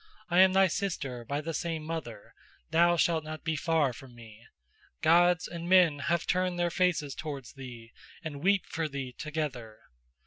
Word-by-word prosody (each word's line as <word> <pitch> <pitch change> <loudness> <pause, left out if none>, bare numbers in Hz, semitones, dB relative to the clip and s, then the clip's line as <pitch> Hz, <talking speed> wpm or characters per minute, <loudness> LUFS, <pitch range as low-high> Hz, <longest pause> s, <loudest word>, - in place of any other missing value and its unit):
I 175 - +4
am 190 0 +7
thy 195 0 +6
sister 155 - -3
by 140 +5 -3
the 165 +2 -4
same 165 0 -3
mother, 155 -10 -6 0.4
thou 170 +1 +4
shalt 165 -2 +2
not 155 0 -7
be 160 -1 -1
far 155 -3 +1
from 125 0 -13
me. 115 -1 -14 0.6
Gods 175 +1 +4
and 170 0 -6
men 180 -6 +5
have 170 +3 0
turned 185 -1 0
their 175 0 0
faces 160 -6 +1
towards 140 -5 -7
thee 120 -4 -10 0.3
and 145 -4 -6
weep 195 +1 +2
for 160 -1 -3
thee 135 -3 -5
together. 140 -8 -4
160 Hz, 170 wpm, -29 LUFS, 135-175 Hz, 0.6 s, am